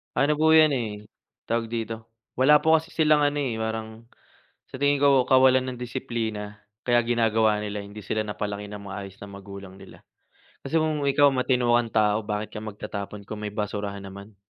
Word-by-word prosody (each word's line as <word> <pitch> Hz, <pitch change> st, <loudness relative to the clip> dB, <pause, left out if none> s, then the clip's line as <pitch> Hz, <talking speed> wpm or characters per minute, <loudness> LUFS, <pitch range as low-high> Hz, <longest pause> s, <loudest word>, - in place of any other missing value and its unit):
Ano 150 Hz, +2 st, +2 dB
po 160 Hz, 0 st, +5 dB
'yan 155 Hz, -2 st, +6 dB
eh, 120 Hz, -5 st, -1 dB, 0.6 s
tawag 115 Hz, 0 st, 0 dB
dito? 115 Hz, 0 st, -5 dB, 0.3 s
Wala 150 Hz, +3 st, +6 dB
po 160 Hz, 0 st, +5 dB
kasi 160 Hz, -, -8 dB
silang 155 Hz, -2 st, +4 dB
ano 145 Hz, 0 st, 0 dB
eh, 120 Hz, -5 st, -2 dB
parang, 110 Hz, 0 st, -5 dB, 0.6 s
sa -, -, -31 dB
tingin 145 Hz, 0 st, +3 dB
ko 140 Hz, -2 st, +5 dB
kawalan 130 Hz, -1 st, +5 dB
ng 125 Hz, -, -8 dB
disiplina. 110 Hz, -4 st, -4 dB, 0.3 s
Kaya 120 Hz, -1 st, +4 dB
ginagawa 110 Hz, -2 st, +2 dB
nila, 105 Hz, -1 st, -4 dB
hindi 100 Hz, +1 st, -11 dB
sila 110 Hz, +3 st, -1 dB
napalaki 105 Hz, 0 st, -4 dB
nang 100 Hz, -1 st, -8 dB
maayos 100 Hz, 0 st, -8 dB
ng 100 Hz, -1 st, -10 dB
magulang 100 Hz, -1 st, -10 dB
nila. -, -, -14 dB, 0.6 s
Kasi 155 Hz, +4 st, -1 dB
kung 155 Hz, -2 st, -1 dB
ikaw 145 Hz, +1 st, +5 dB
matino 125 Hz, -2 st, +1 dB
kang 120 Hz, -1 st, +1 dB
tao, 105 Hz, 0 st, +2 dB
bakit 105 Hz, 0 st, -4 dB
ka 105 Hz, -, -6 dB
magtatapon 105 Hz, -1 st, -7 dB
kung 110 Hz, -1 st, -6 dB
may 105 Hz, -, -3 dB
basurahan 105 Hz, -1 st, -4 dB
naman. 100 Hz, +1 st, -11 dB
110 Hz, 180 wpm, -25 LUFS, 105-130 Hz, 0.6 s, yan